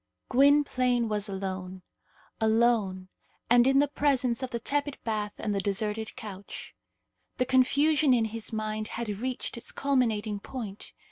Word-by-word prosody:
Gwynplaine 255 -3 +3
was 210 -1 0
alone 190 -1 -5 0.6
alone, 220 -4 +2 0.4
and 245 +1 +6
in 270 0 +4
the 290 +1 +4
presence 265 -4 +1
of 260 - -3
the 235 - -3
tepid 285 +3 -2
bath 210 -2 -2
and 210 - -2
the 200 - 0
deserted 210 +2 -2
couch. 200 -2 -8 0.6
The 255 - +1
confusion 280 +3 +4
in 235 -3 +4
his 225 +1 -6
mind 215 -1 -3
had 235 -1 -4
reached 255 0 -3
its 235 - -4
culminating 225 -7 0
point. 215 -3 -7
230 Hz, 140 wpm, -28 LUFS, 210-260 Hz, 0.6 s, and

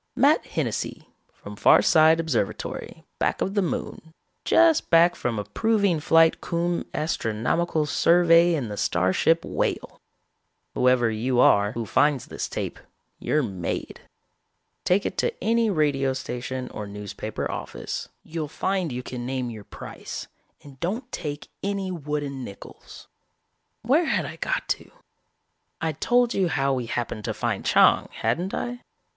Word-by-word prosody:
Matt - - +4
Hennessy, - - -3 0.2
from 105 - -11
Farside 160 - +5
Observatory, 155 -11 -3 0.2
back - - 0
of 195 - -1
the 205 - +2
Moon, 160 -2 -4 0.3
just 330 -2 +4
back 170 +1 +5
from 120 -2 -2
a 105 - -2
proving 200 - +1
flight 165 +1 +4
cum 170 0 -1
astronomical 150 +3 -1
survey 170 +2 +4
in 135 -7 -2
the 105 -1 -6
starship 95 - +2
Whale. - - -3 0.7
Whoever 125 -2 +3
you 120 +3 0
are 100 -3 +5
who 115 -1 -3
finds 140 +4 +2
this - - -5
tape, - - -4 0.4
you're 150 -1 +1
made. 95 -7 -4 0.8
Take 190 +3 +2
it - - -3
to 475 -1 0
any 230 0 +2
radio 145 -6 +1
station 130 0 -5
or 105 -1 -6
newspaper 100 0 -5
office. - - -5
You'll 160 -1 -4
find 185 +1 -1
you 125 +1 -4
can 125 -1 -6
name 130 -2 -2
your 105 -3 -10
price - - -8 0.4
and 140 -2 -14
don't 230 +9 -3
take 150 -3 -5
any 195 -1 -2
wooden 145 -5 -4
nickels. 100 -4 -11 0.8
"Where 285 +9 +3
had - - 0
I - - -7
got - - -2
to? - - -2 0.9
I'd 160 -2 -3
told 245 -1 +3
you 190 -2 +1
how 140 -3 +1
we 125 -3 -2
happened 115 -2 -3
to - - -2
find - - -2
Chang, - - +4
hadn't 180 +3 -1
I? 245 0 -4
150 Hz, 140 wpm, -25 LUFS, 125-175 Hz, 0.9 s, Farside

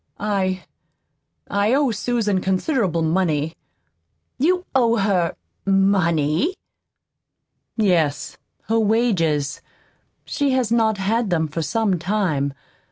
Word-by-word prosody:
I 190 -3 -1 0.8
I 205 +5 +1
owe 280 -3 +2
Susan 215 -3 0
considerable 190 - 0
money." 160 -2 0 0.9
"You 360 +6 +2
owe 235 -3 +3
her 195 -5 +1 0.3
MONEY?" 195 - +2 1.2
"Yes, 175 -9 +1 0.3
her 225 +1 +1
wages. 190 - +1 0.6
She 280 -2 0
has 250 -4 0
not 220 -2 +2
had 215 +3 0
them 160 -3 +1
for 155 +2 -4
some 200 +1 0
time. 160 -8 -1
195 Hz, 100 wpm, -21 LUFS, 170-225 Hz, 1.2 s, owe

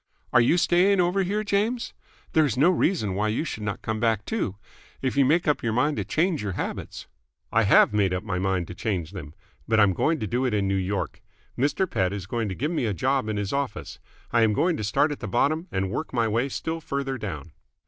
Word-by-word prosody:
"Are 125 - +7
you 140 +9 +3
staying 185 +3 +3
over 180 +2 +2
here, 205 +3 -1
James? 215 +4 -1 0.4
There 160 - +5
is 140 -4 0
no 160 +7 +5
reason 160 - +1
why 105 +3 0
you 110 +8 0
should 140 -8 -5
not 105 -1 -4
come 110 -1 -2
back, 110 -2 +1
too. 210 - -2 0.4
If 130 -1 -2
you 140 -1 +4
make 160 +6 +2
up 150 - +2
your 115 -1 -1
mind 145 +5 +1
to - - -1
change 165 -1 0
your 100 -2 -3
habits - - -5 0.2
" - - -49
"I - - +4
have - - +5
made 100 -3 +2
up 90 +1 -2
my 95 -4 -2
mind 95 -2 0
to - - -5
change 90 -5 -3
them. 80 -6 -9 0.3
But 110 - +3
I'm 100 -2 +5
going 155 - +1
to - - -2
do 120 +6 -1
it 125 -5 +1
in 100 -1 +1
New 95 - +1
York. 95 +1 -2 0.3
Mr. 145 +8 +1
Pett 95 - 0
is 100 -3 -5
going 115 +2 -2
to 95 - -4
give 150 - -2
me 155 -9 0
a 105 - -1
job 130 +1 0
in 105 - -2
his 100 -1 -2
office. 140 -5 -3 0.3
I 120 - +3
am 110 -1 +4
going 170 - +2
to - - -4
start 105 +9 +2
at 145 - -5
the - - -5
bottom 155 +8 +1
and 95 0 -1
work 155 - -4
my 115 -2 +2
way 115 +5 0
still 165 +4 -4
further 140 -3 -3
down." 90 -5 -6
120 Hz, 245 wpm, -25 LUFS, 100-155 Hz, 0.4 s, Are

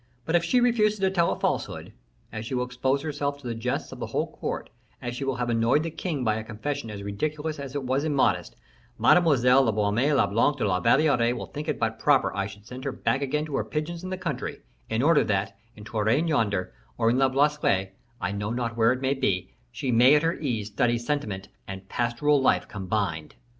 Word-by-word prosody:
But 165 - 0
if 170 - +3
she 250 - +3
refuses 225 -3 +3
to 190 -1 +2
tell 170 -3 +2
a - - -3
falsehood, - - -2 0.4
as 110 -1 -4
she 130 - -3
will 125 0 0
expose 130 +3 -1
herself 145 -2 -2
to 140 - -17
the 120 - -2
jests 115 +2 -3
of - - -9
the - - -4
whole - - -2
court, - - -4 0.3
as 120 0 -5
she 135 - -4
will 135 -1 -1
have 120 0 -1
annoyed 115 +6 +2
the 165 - -3
king 155 -5 -3
by 110 -2 +1
a 110 - -4
confession 115 +3 -4
as 100 -2 -7
ridiculous 150 +9 -3
as 140 -1 -7
it 140 - -2
was 130 +2 0
immodest, 145 -4 +1 0.4
Mademoiselle 135 -7 +5
la 120 -4 +2
Baume 105 +7 +1
le 140 - +4
Blanc 115 +8 +2
de 130 - 0
la 90 -2 +1
Valliere 120 0 +3
will - - -5
think 150 +2 -7
it - - -1
but 110 0 -1
proper 145 -3 +3
I 100 0 -1
should 105 +1 -13
send 125 +3 -9
her 140 - -2
back 130 +1 -1
again 150 +2 -1
to 150 -3 -5
her - - 0
pigeons 165 +3 -4
in 185 - -5
the 185 - -3
country, 170 -8 -4 0.3
in 115 +3 0
order 160 0 +5
that, 100 0 -1 0.2
in 105 - -11
Touraine 110 +8 +1
yonder, 100 - 0 0.2
or 115 -1 +3
in 125 - +1
Le 135 -1 +4
Blaisois, 135 -9 +2 0.3
I 90 - -2
know 100 +1 -3
not 120 0 -2
where 115 0 +4
it 130 0 -2
may 135 0 +1
be, 95 -9 -1 0.2
she 130 - -3
may 125 +5 +6
at 150 - +3
her 165 +1 +2
ease 120 -9 -2
study 120 +3 +1
sentiment 115 -7 -3 0.2
and 95 0 -8
pastoral 130 +6 +1
life - - +2
combined." 95 -5 -3
125 Hz, 225 wpm, -26 LUFS, 110-150 Hz, 0.4 s, may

